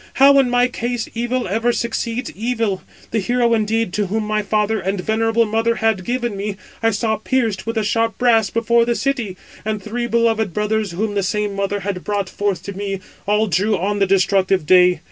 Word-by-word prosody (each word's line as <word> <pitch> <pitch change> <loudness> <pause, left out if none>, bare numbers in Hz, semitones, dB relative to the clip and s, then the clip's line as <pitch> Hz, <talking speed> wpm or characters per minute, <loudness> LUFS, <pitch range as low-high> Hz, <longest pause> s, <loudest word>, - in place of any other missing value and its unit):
How 275 +1 +7
in 265 -2 +3
my 245 0 +3
case 245 -1 -3
evil 240 +1 -1
ever 225 +5 +1
succeeds 235 +1 -2
evil. 225 -3 -2 0.3
The 225 - +1
hero 240 +3 +1
indeed 225 -2 0
to 205 0 0
whom 215 +3 -1
my 215 0 0
father 210 +1 0
and 195 +1 -2
venerable 225 +3 +1
mother 225 +2 +1
had 220 -4 0
given 240 -1 -2
me, 200 +1 -3 0.3
636 - - -26
I 225 - +5
saw 220 +1 0
pierced 225 -3 -1
with 230 - -2
the 220 - +1
sharp 225 +2 0
brass 225 -4 +3
before 235 0 +2
the 235 0 0
city; 240 -10 -2 0.3
and 215 0 -2
three 235 +4 -3
beloved 225 -4 +1
brothers 210 -2 -1
whom 205 +4 -2
the 200 - 0
same 205 +1 -1
mother 200 +1 -2
had 195 -1 -4
brought 200 -2 -2
forth 200 -3 -2
to 200 - -6
me, 195 -1 -3 0.3
all 210 +1 +3
drew 205 +2 +1
on 205 +3 -1
the 195 - +3
destructive 190 -2 +2
day. 180 0 +5
220 Hz, 200 wpm, -19 LUFS, 200-230 Hz, 0.3 s, How